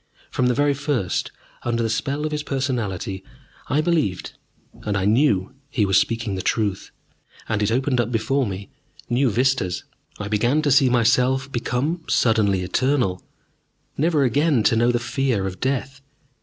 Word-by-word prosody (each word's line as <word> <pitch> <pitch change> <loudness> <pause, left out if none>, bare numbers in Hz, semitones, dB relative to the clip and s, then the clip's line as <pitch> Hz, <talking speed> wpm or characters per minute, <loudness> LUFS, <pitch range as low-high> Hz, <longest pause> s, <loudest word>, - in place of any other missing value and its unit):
From 125 - +1
the 125 - +2
very 145 0 +2
first, 140 - -2 0.3
under 115 -1 -1
the - - +1
spell 140 +6 -2
of 155 - -2
his 150 0 -2
personality, 115 -10 -3 0.4
I 145 +3 +2
believed, 155 - -1 0.5
and 105 -2 -1
I 95 - -1
knew 110 -2 +2 0.2
he 115 -7 +1
was 95 0 +4
speaking 115 -1 -1
the 95 - -3
truth. 100 -1 -1 0.6
And 110 -2 -1
it 105 +1 +1
opened 130 +1 +1
up 120 0 -3
before 125 +3 0
me 100 +6 -6 0.4
new 125 +2 +3
vistas. 120 -5 0 0.3
I 105 - -5
began 120 +9 +1
to 145 - +2
see 135 0 +5
myself 125 +3 +2
become 130 +8 -2
suddenly 105 -5 +2
eternal, 120 -2 0 0.7
never 155 -1 +2
again 140 0 +2
to 115 - +3
know 120 +2 +3
the 120 - +1
fear 120 -4 -1
of 90 -1 -5
death. 135 0 -2
120 Hz, 160 wpm, -22 LUFS, 105-140 Hz, 0.7 s, see